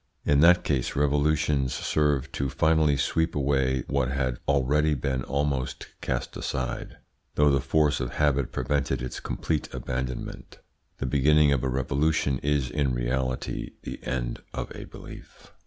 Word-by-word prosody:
In 70 -1 +4
that 90 +3 +6
case 65 -5 -1
revolutions 75 -1 +1
serve 75 -3 0
to 70 - -2
finally 80 -1 +3
sweep 80 +4 0
away 65 -2 +1
what 70 -3 0
had 65 -2 -1
already 75 +2 +2
been 65 -1 -1
almost 70 0 -2
cast - - -3
aside, 60 -2 -4 0.4
though 75 -1 +4
the 70 - +3
force 75 +2 +2
of 60 -1 -3
habit 70 -4 +1
prevented 65 0 -1
its 65 - -5
complete 80 -2 -2
abandonment. 65 0 -5 0.4
The - - -3
beginning 75 +2 +4
of 65 -3 0
a 65 - 0
revolution 70 +2 +1
is 70 -4 0
in 70 -3 0
reality 65 +1 -2
the - - -7
end - - -3
of - - -5
a - - -7
belief. - - -13
70 Hz, 145 wpm, -27 LUFS, 65-75 Hz, 0.4 s, that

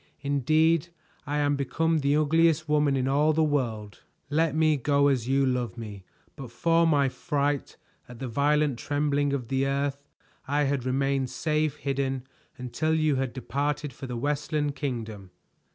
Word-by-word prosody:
Indeed 155 +4 +2 0.4
I 145 +1 -1
am 145 -1 +2
become 160 +4 0
the 140 0 +2
ugliest 155 +1 +3
woman 150 -2 +2
in 130 0 0
all 150 +3 +3
the 160 +1 +2
world. 115 -9 -2 0.3
Let 160 0 +1
me 155 -1 +3
go, 140 +1 +2
as 125 -4 0
you 135 +1 +2
love 125 -6 -1
me. 105 -5 -8 0.3
But 135 -4 -8
for 165 +6 +2
my 145 -3 +3
fright 145 0 -2 0.3
at 125 - -10
the 130 +2 -5
violent 145 +1 +1
trembling 145 -1 0
of 130 -4 -3
the 135 0 +1
earth 140 +1 -2 0.4
I 145 +2 +1
had 135 -3 -1
remained 135 0 0
safe 155 0 -1
hidden 135 -2 -2 0.3
until 125 +6 -1
you 155 -3 +2
had 130 -2 -1
departed 145 +2 -3
for 135 - -8
the 125 -1 -4
Westland 145 +2 -1
Kingdom." 110 -9 -5
140 Hz, 160 wpm, -27 LUFS, 130-150 Hz, 0.4 s, ugliest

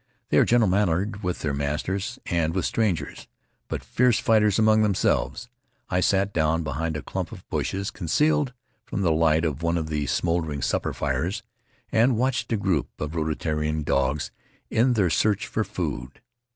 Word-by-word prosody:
They - - +4
are - - +5
gentle 120 -2 +4
mannered 100 +2 +1
with 90 -3 -2
their 75 -2 -1
masters 75 +8 -2
and 85 -2 0
with 95 - 0
strangers, 90 -11 -1 0.4
but - - -4
fierce 125 -2 +2
fighters 105 -3 +3
among 110 0 +4
themselves. 105 +2 +1 0.4
I 90 - +2
sat 100 +2 +2
down 80 +1 +1
behind 80 +2 -2
a 75 - -7
clump - - -4
of - - -11
bushes, 100 +1 -2
concealed 140 - +1 0.3
from 100 - -3
the 85 - +3
light 80 0 +3
of 75 -1 -2
one 85 +1 +1
of 80 -2 -3
the 75 -2 -1
smol 85 +7 +1
dering 75 -3 -4
supper - - 0
fires, 100 +7 -2 0.5
and 115 +1 +3
watched 125 -1 0
a 115 - +2
group 95 -8 0
of 75 0 -3
Rutiaroan 75 -1 -1
dogs 75 0 0 0.4
in 120 +3 +3
their 95 -7 +2
search 105 +4 +2
for 110 - -1
food. 70 - -5
90 Hz, 170 wpm, -25 LUFS, 80-105 Hz, 0.5 s, are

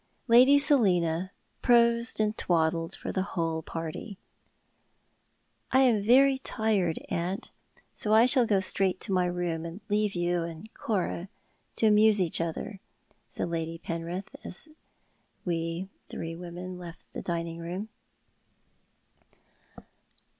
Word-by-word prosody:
Lady 255 +4 +7
Selina 185 - +3 0.3
prosed 235 -2 +3
and 215 0 +1
twaddled 165 0 0
for - - -5
the 190 - -1 0.2
whole 165 -1 0
party. 165 +6 -6 0.8
" - - -43
I 260 - +5
am 240 -6 +4
very 265 +5 +5
tired, 210 -10 0
aunt, 180 +3 -3 0.4
so 210 - -3
I 220 +2 +7
shall 250 -1 +5
go 200 -3 +3
straight 190 0 0
to 200 - -4
my 180 -1 +2
room, 175 -2 -2
and 170 +3 -7
leave 210 -1 +1
you 175 0 0
and 165 +6 -7
Cora 190 -3 -2 0.5
to - - +1
amuse 215 0 +5
each 170 -3 0
other," 170 +5 -4 0.5
said - - -4
Lady 165 0 -3
Penrith, 170 +3 -5
as 250 - -5 0.8
we 165 +1 -2 0.2
three 165 0 -5
women 180 +1 -7
left 170 -2 -10
the - - -5
dining 170 -1 -3
room. 180 +6 -5
185 Hz, 125 wpm, -28 LUFS, 170-220 Hz, 0.8 s, Lady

